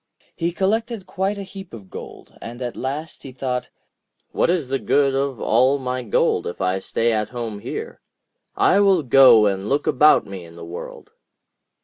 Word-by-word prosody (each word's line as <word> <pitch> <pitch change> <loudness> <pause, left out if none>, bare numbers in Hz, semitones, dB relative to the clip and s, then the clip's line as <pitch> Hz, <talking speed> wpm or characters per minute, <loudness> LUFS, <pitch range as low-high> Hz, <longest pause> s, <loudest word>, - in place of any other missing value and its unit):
He 170 +1 -1
collected 220 +3 -1
quite 195 +2 -2
a 200 - -5
heap 190 - -10
of 100 -4 -14
gold, - - -10
and 120 +1 -8
at 120 - -4
last 150 +4 -5
he 135 - -9
thought: 125 -1 -3 0.6
'What - - +1
is 170 -6 0
the 135 0 -1
good 140 -1 +2
of 135 -3 -1
all 130 +5 +3
my 130 -1 -3
gold 115 -5 +1
if 85 - -6
I 95 0 0
stay 115 +4 0
at 105 -1 -1
home 115 -4 -5
here? - - -7 0.5
I 195 - +4
will 195 -5 +4
go 125 -4 +7
and 100 0 -1
look 140 +1 0
about 150 +4 +4
me 95 -2 -8
in 85 0 -14
the 85 0 -9
world.' 85 +1 -9
130 Hz, 185 wpm, -21 LUFS, 110-165 Hz, 0.6 s, go